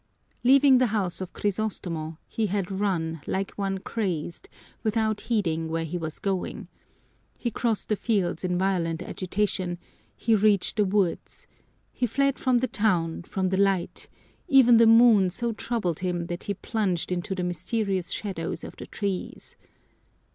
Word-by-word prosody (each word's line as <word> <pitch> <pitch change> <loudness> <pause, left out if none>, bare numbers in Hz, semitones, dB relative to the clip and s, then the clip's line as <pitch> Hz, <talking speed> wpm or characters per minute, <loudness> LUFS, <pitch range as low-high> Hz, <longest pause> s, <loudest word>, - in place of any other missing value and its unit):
Leaving 270 +1 +6
the 255 - +3
house 200 -5 -2
of 185 - -5
Crisostomo, 180 -6 -3
he 220 -2 -1
had 195 -1 -2
run 175 -5 -1
like 195 +1 -1
one 195 -1 -2
crazed, 190 - -4 0.3
without 220 -1 0
heeding 165 -8 -1
where 165 0 -1
he 160 +3 -5
was 160 -1 -4
going. 195 -2 -3 0.7
He 235 - -2
crossed 225 -1 -1
the 215 - +2
fields 200 -5 -1
in 180 -1 0
violent 180 -3 0
agitation, 185 -1 -2 0.4
he 225 - +1
reached 210 -1 +3
the 210 - +4
woods; 190 -2 -1 0.5
he 245 - -1
fled 275 +4 +1
from 255 -2 +3
the 255 - +1
town, 180 -9 0
from 185 +2 -2
the 190 - 0
light 195 -3 0 0.4
even 250 -4 +7
the 230 0 +6
moon 225 -4 +7
so 235 +6 -2
troubled 210 -7 -2
him 180 -2 -2
that 175 +1 -6
he 200 - -2
plunged 195 -4 -2
into 180 +2 -2
the 180 - -2
mysterious 185 +1 -2
shadows 185 -6 -4
of - - -8
the - - -8
trees. 195 -3 -4
195 Hz, 155 wpm, -26 LUFS, 175-220 Hz, 0.7 s, even